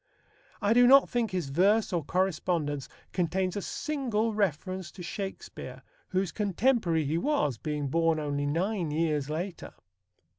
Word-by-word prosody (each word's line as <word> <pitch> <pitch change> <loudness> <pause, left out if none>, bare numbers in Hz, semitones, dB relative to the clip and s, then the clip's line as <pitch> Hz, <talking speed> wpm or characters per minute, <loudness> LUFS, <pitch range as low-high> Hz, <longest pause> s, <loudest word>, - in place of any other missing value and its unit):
I 205 +2 +4
do 245 +1 +6
not 275 +2 +7
think 235 -2 +1
his 180 -7 -3
verse 195 +8 +3
or 170 -3 0
correspondence 165 -5 -1 0.2
contains 185 +1 0
a 205 - -2
single 240 -5 -1
reference 185 -2 -1
to 180 - -9
Shakespeare, 195 +2 -6 0.2
whose 185 -2 -1
contemporary 200 - +1
he 155 +4 0
was, 170 - 0
being 150 -2 -2
born 165 +2 +2
only 145 -1 -1
nine 175 +3 0
years 150 -2 0
later. 170 +4 -5
180 Hz, 140 wpm, -29 LUFS, 155-210 Hz, 0.2 s, not